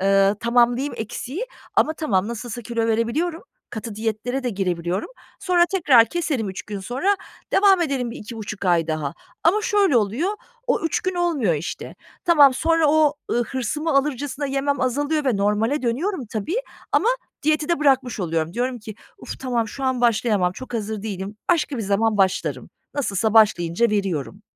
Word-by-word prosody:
eee, 195 Hz, +1 st, +4 dB
tamamlayayım 240 Hz, +3 st, +2 dB
eksiyi 260 Hz, -, -5 dB, 0.3 s
ama 315 Hz, -, +3 dB
tamam 215 Hz, -, 0 dB
nasılsa 235 Hz, 0 st, -5 dB
kilo 230 Hz, 0 st, -1 dB
verebiliyorum, 255 Hz, +10 st, 0 dB, 0.3 s
katı 220 Hz, -1 st, -6 dB
diyetlere 225 Hz, +4 st, -2 dB
de 245 Hz, -, -1 dB
girebiliyorum. 180 Hz, -2 st, -2 dB, 0.3 s
Sonra 355 Hz, -2 st, +4 dB
tekrar 300 Hz, -11 st, +5 dB
keserim 280 Hz, -, -2 dB
3 190 Hz, -, -6 dB
gün 205 Hz, -2 st, -6 dB
sonra, 270 Hz, -, 0 dB, 0.4 s
devam 390 Hz, -2 st, +5 dB
ederim 270 Hz, -7 st, -1 dB
bir -, -, -7 dB
2,5 215 Hz, -2 st, -7 dB
ay 170 Hz, -2 st, +3 dB
daha 155 Hz, -3 st, -2 dB, 0.3 s
ama 390 Hz, +6 st, +4 dB
şöyle 395 Hz, -10 st, +3 dB
oluyor, 235 Hz, -, +1 dB, 0.3 s
o 485 Hz, -, +1 dB
3 325 Hz, -, 0 dB
gün 370 Hz, 0 st, -2 dB
olmuyor 310 Hz, -, +1 dB
işte. 155 Hz, +4 st, -5 dB, 0.3 s
Tamam 290 Hz, -6 st, +6 dB
sonra 325 Hz, +1 st, +2 dB
o, 305 Hz, -1 st, +4 dB, 0.2 s
ııı, 240 Hz, 0 st, +1 dB
hırsımı 270 Hz, +7 st, -2 dB
alırcasına 285 Hz, 0 st, 0 dB
yemem 275 Hz, 0 st, -1 dB
azalıyor 290 Hz, +4 st, 0 dB
ve 250 Hz, -6 st, +2 dB
normale 210 Hz, +8 st, +1 dB
dönüyorum 270 Hz, -, -1 dB
tabii 220 Hz, -, -3 dB, 0.4 s
ama 460 Hz, -, +3 dB, 0.3 s
diyeti 305 Hz, +1 st, +1 dB
de 340 Hz, -, +2 dB
bırakmış 265 Hz, -6 st, +2 dB
oluyorum. 165 Hz, -1 st, -1 dB
Diyorum 245 Hz, +1 st, -1 dB
ki 215 Hz, 0 st, -9 dB, 0.2 s
"Uf -, -, -8 dB
tamam, 240 Hz, -4 st, -1 dB
şu 270 Hz, +5 st, -6 dB
an 260 Hz, -2 st, 0 dB
başlayamam, 220 Hz, -6 st, +2 dB
çok 260 Hz, +3 st, -9 dB
hazır 215 Hz, -1 st, -3 dB
değilim, 200 Hz, -1 st, -5 dB
başka 310 Hz, -5 st, +1 dB
bir 230 Hz, -, -3 dB
zaman 210 Hz, +2 st, +1 dB
başlarım. 190 Hz, -2 st, 0 dB, 0.2 s
Nasılsa 220 Hz, -5 st, 0 dB
başlayınca 210 Hz, 0 st, +4 dB
veriyorum." 195 Hz, -2 st, -2 dB
240 Hz, 160 wpm, -22 LUFS, 210-295 Hz, 0.4 s, Tamam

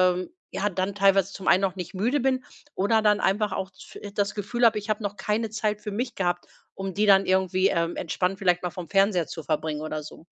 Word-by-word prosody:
ähm, 185 Hz, +1 st, -4 dB, 0.2 s
ja 200 Hz, -, -1 dB
dann 190 Hz, +2 st, -2 dB
teilweise 195 Hz, -1 st, +3 dB
zum 195 Hz, -, -8 dB
einen 185 Hz, -, +5 dB
noch 195 Hz, -2 st, 0 dB
nicht 180 Hz, 0 st, -6 dB
müde 235 Hz, +10 st, +1 dB
bin 260 Hz, 0 st, +1 dB, 0.3 s
oder 220 Hz, +3 st, +2 dB
dann 210 Hz, -1 st, +4 dB
einfach 210 Hz, +1 st, +1 dB
auch 190 Hz, 0 st, -3 dB
z 185 Hz, -, -14 dB
äh, 205 Hz, -, -7 dB
das 205 Hz, 0 st, -1 dB
Gefühl 240 Hz, +4 st, 0 dB
habe, 225 Hz, -2 st, +4 dB
ich 210 Hz, +1 st, -10 dB
habe 215 Hz, 0 st, -1 dB
noch 205 Hz, 0 st, -3 dB
keine 215 Hz, +1 st, -1 dB
Zeit 215 Hz, -1 st, -1 dB
für 210 Hz, 0 st, -6 dB
mich 240 Hz, +4 st, -3 dB
gehabt, 175 Hz, -2 st, -1 dB, 0.3 s
um 195 Hz, -1 st, -5 dB
die 210 Hz, -, +2 dB
dann 195 Hz, -1 st, +5 dB
irgendwie, 185 Hz, 0 st, +2 dB
ähm, 170 Hz, 0 st, 0 dB
entspannt 180 Hz, +3 st, -1 dB
vielleicht 180 Hz, -3 st, +2 dB
mal 180 Hz, -, -2 dB
vom 175 Hz, -2 st, -8 dB
Fernseher 195 Hz, -4 st, +3 dB
zu 160 Hz, -, -7 dB
verbringen 155 Hz, -1 st, -2 dB
oder 155 Hz, 0 st, -4 dB
so. 155 Hz, +2 st, -12 dB
195 Hz, 235 wpm, -26 LUFS, 180-210 Hz, 0.3 s, einen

